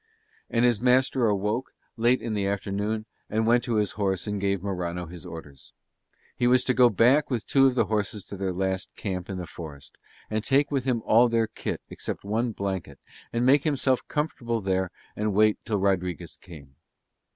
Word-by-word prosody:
And 115 +1 +2
his 120 -3 +2
master 125 -1 +3
awoke, 105 +5 -1 0.2
late 120 +2 +2
in 115 -2 -2
the 100 -2 0
afternoon, 100 +2 -2 0.2
and 110 +1 0
went 120 +1 +4
to 120 - -1
his 105 -2 +1
horse 95 -3 -1
and 105 -2 -3
gave 100 -2 0
Morano 90 -3 -3
his 85 -1 -10
orders. 70 -5 -10 0.6
He 120 - +1
was 125 +1 +4
to 130 - +1
go 125 -1 +6
back 125 +8 +4
with 120 -5 -2
two 135 -1 +5
of 130 - +1
the 115 - +3
horses 105 -1 -2
to - - -7
their 95 -1 -2
last 95 +1 -2
camp 95 -3 -4
in 95 - -4
the 90 - -4
forest 70 -6 -10 0.3
and 110 0 -2
take 140 +4 +2
with 135 -3 0
him 120 -4 0
all 120 +2 +5
their 115 -1 +2
kit 110 - -5
except - - -6
one 115 +4 0
blanket 95 -9 -4 0.3
and 120 +1 0
make 135 +2 +6
himself 135 -4 +1
comfortable 125 -7 -2
there 95 -2 0 0.3
and 105 -1 -1
wait 110 0 +4
till 105 - 0
Rodriguez 90 -4 -1
came. 75 -7 -13
105 Hz, 190 wpm, -26 LUFS, 95-120 Hz, 0.6 s, go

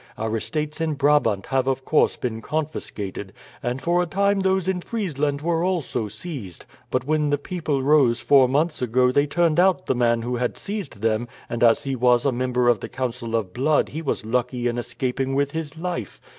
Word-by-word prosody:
Our 110 0 -2
estates 150 +6 -3
in 160 -2 0
Brabant 140 -8 +2
have 135 -1 0
of 135 0 -1
course 155 - +3
been 115 -3 -4
confiscated, 105 -10 -4 0.3
and 120 +2 -2
for 175 +4 +1
a 175 - -1
time 200 +2 +1
those 190 -1 +1
in 185 -1 0
Friesland 150 - -2
were 165 +1 0
also 165 -11 -1
seized. 110 - -7 0.2
But 130 0 -1
when 150 0 +1
the 145 - +2
people 150 -3 -2
rose 135 -5 +4
four 130 +1 +5
months 155 +4 0
ago 125 +1 +3
they 140 +3 +2
turned 170 +1 +2
out 185 -3 +3
the - - +1
man 120 -2 +1
who 125 +1 -2
had 125 0 -2
seized 195 - -5
them, 115 +1 +1 0.2
and 120 0 -1
as 115 -1 +5
he 135 -1 -2
was 125 0 +3
a 140 - +3
member 125 0 0
of 120 -3 +4
the - - -7
Council 125 -2 -3
of 100 -5 -2
Blood 145 +5 +2
he 160 - -5
was 140 -7 -2
lucky 125 +1 -1
in 120 0 -1
escaping 130 +2 -2
with 140 0 +1
his 160 -1 -5
life. 165 - -4
135 Hz, 200 wpm, -23 LUFS, 120-155 Hz, 0.3 s, four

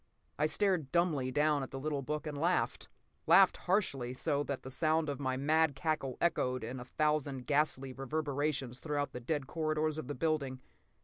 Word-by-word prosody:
I 150 - +3
stared 175 -4 +1
dumbly 160 -7 +1
down 150 +2 +2
at 135 - -5
the 135 - -6
little 145 0 -2
book 150 +3 -3
and 150 -1 -4
laughed. 170 +5 0 0.4
Laughed - - +7
harshly, 140 - 0
so 140 +2 0
that 140 -2 -4
the 130 - -7
sound 155 +3 +1
of 140 - -3
my 130 -2 -1
mad 155 +1 +2
cackle 135 -3 -2
echoed 130 -7 +1
in 125 +3 -5
a 125 - -7
thousand 145 -2 0
ghastly 140 -3 +1
reverberations 140 -2 -2
through 145 -2 -1
the - - -6
dead 145 +3 -2
corridors 155 0 -1
of 135 - -6
the 145 - -4
building. 140 -3 -1
145 Hz, 180 wpm, -33 LUFS, 130-155 Hz, 0.4 s, Laughed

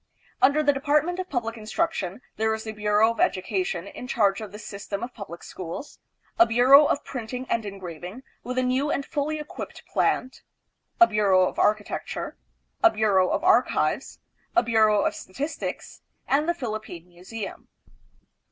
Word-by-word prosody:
Under 290 +3 +4
the 290 -1 +4
Department 300 +6 +1
of 370 -1 -4
Public 230 -4 -2
Instruction 220 - -2
there 220 +1 +1
is 220 - -7
the 220 - -5
Bureau 210 +1 +3
of 230 - -8
Education 185 -2 0
in 245 +5 -9
charge 205 -6 +2
of 215 -3 -7
the 210 - -8
system 200 0 -6
of 245 +1 -6
public 185 -6 -9
schools; 185 - -7 0.4
a 345 - +8
Bureau 265 +5 +7
of 285 - 0
Printing 250 0 -5
and 225 -2 0
Engraving, 185 +3 -8 0.2
with 250 +1 -5
a 255 - +2
new 260 +3 +1
and 280 - -1
fully 305 0 -2
equipped 300 0 -8
plant; 255 - 0 0.6
a 350 - +10
Bureau 195 - +3
of - - -5
Architecture; 210 0 -1 0.5
a 340 - +8
Bureau 205 - +2
of - - -1
Archives; 370 +1 +2 0.4
a 355 - +5
Bureau 215 -3 +4
of - - +1
Statistics; 285 +12 -6 0.3
and 300 +4 +2
the 345 - +1
Philippine 215 - -6
Museum. 185 +4 -8
225 Hz, 160 wpm, -25 LUFS, 200-280 Hz, 0.6 s, a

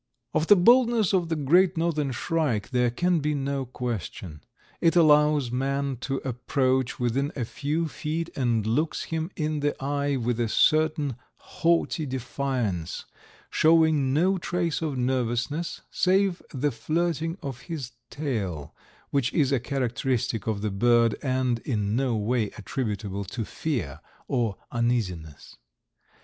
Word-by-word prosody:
Of 160 - +1
the 205 - +8
boldness 230 +1 +4
of 175 -3 +1
the 165 - 0
Great 170 +5 +3
Northern 155 -4 0
Shrike 130 - -1
there 125 -1 +2
can 175 +8 +1
be 150 0 0
no 140 -1 -2
question. 105 -10 -5 0.4
It 165 0 +3
allows 150 -5 +4
man 135 +1 -1
to 135 - -2
approach 130 0 0
within 130 +4 0
a 125 - -2
few 155 +7 -2
feet 160 +2 -4
and 120 -5 +1
looks 150 +9 0
him 160 +1 -3
in 155 -2 -1
the 145 0 -1
eye 140 +1 -1
with 120 -2 -1
a 115 -2 0
certain 155 -2 +2 0.2
haughty 165 -2 0
defiance, 125 - -3 0.5
showing 160 -4 +4
no 180 +7 +2
trace 170 -2 -1
of 150 -4 -2
nervousness, 125 +5 -1
save 190 0 +2
the 145 +1 0
flirting 165 +5 -1
of 135 -3 -5
his 140 -8 -4 0.2
tail, 100 - -3 0.4
which 135 -4 +1
is 140 -4 +2
a 135 - +2
characteristic 125 -4 -1
of 105 -2 -1
the 105 - 0
bird 115 +2 +3
and 130 -3 0
in 105 -5 -1
no 130 -2 +1
way 110 0 0
attributable 100 -3 -3
to 110 +4 -4
fear 105 - -3 0.3
or 115 -6 0
uneasiness. 100 - -2
135 Hz, 135 wpm, -26 LUFS, 120-155 Hz, 0.5 s, the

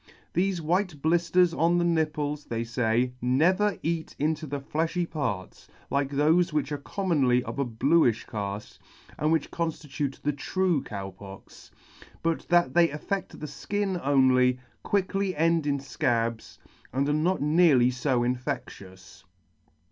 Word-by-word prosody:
Thefe 190 0 +1
white 175 0 0
blitters 170 +2 +3
on 170 +2 +2
the 175 - +2
nipples, 150 -3 -1
they 115 0 -3
fay, 120 +1 0
never 180 - +2
eat 165 0 -2
into 155 +1 -1
the 145 +1 -3
fiejhy. 165 +5 -1
parts 105 - -4 0.2
like 140 0 +1
thofe 160 +5 +3
which 150 -1 -1
are 145 - -2
commonly 140 -9 +1
of - - -6
a 140 - +1
blueifh 120 +1 +2
caft, 100 -1 -6 0.4
and 155 +1 +1
which 160 -2 0
conflitute 150 -4 -3
the 150 - +1
true 175 +2 0
Cow 100 -2 -6
Pox, 95 +1 -13 0.5
but 165 -1 -1
that 175 -7 +3
they 170 -1 +5
affedt 170 +7 -3
the 150 -1 -9
{kin 200 -3 0
only, 130 -2 +4 0.2
quickly 195 -1 0
end 165 0 +2
in 140 -1 +1
fcabs, 115 -4 -2 0.3
and 135 +3 0
are 145 - +1
not 170 +5 +1
nearly 150 -5 +4
fo 125 -1 0
infectious. 95 -7 -5
150 Hz, 140 wpm, -27 LUFS, 125-170 Hz, 0.5 s, they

